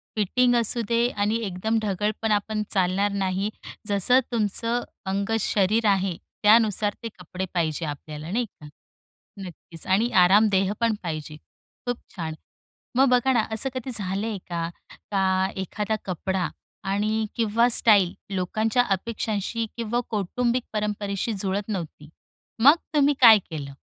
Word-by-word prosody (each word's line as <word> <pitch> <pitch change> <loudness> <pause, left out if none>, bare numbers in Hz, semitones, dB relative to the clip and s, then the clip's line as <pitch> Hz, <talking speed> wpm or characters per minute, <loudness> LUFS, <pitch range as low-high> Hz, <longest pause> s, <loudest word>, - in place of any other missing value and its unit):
Fitting 245 +4 +2
असू 235 +1 +1
दे 235 0 +3
आणि 205 0 -1
एकदम 200 +4 -1
ढगळपणा 210 +2 0
पण 215 -1 -2
चालणार 195 +2 +1
नाही. 195 +1 -1 0.4
जसं 205 +5 +4
तुमचं 230 +2 0 0.3
अंग-शरीर 210 +1 +1
आहे, 190 -3 +1 0.3
त्यानुसार 210 -1 +4
ते 230 - -3
कपडे 180 +1 -5
पाहिजे 165 -1 -1
आपल्याला, 150 +2 -7
नाही 240 +3 0
का? 150 -8 -15 0.7
नक्कीच. 175 -3 -10
आणि 210 +6 +2 0.2
आरामदेह 195 0 +4
पण 230 -2 +2
पाहिजे. 155 -2 -5 0.5
खूप 245 -1 -1 0.2
छान. 165 -4 -4 0.6
मग 270 -1 +5
बघा 250 +1 +3
ना 240 - +3
असं 220 +5 0
कधी 255 0 -5
झालंय 205 +1 -1
का? 170 -1 -2 0.4
का 190 -1 +1
एखादा 210 +3 -2
कपडा 185 0 -2 0.4
आणि 215 +2 0
किंवा 230 +1 +2
स्टाईल 205 -6 +5 0.2
लोकांच्या 215 +6 +1
अपेक्षांशी 220 +2 -2
किंवा 235 +1 -1
कौटुंबिक 235 +4 -1
परंपरेशी 210 0 -2
जुळत 195 0 -1
नव्हती, 160 -6 -5 0.5
मग 285 +4 +9 0.2
तुम्ही 290 -1 +4
काय 225 -3 +10
केलं? 140 -4 -6
205 Hz, 130 wpm, -24 LUFS, 185-230 Hz, 0.7 s, काय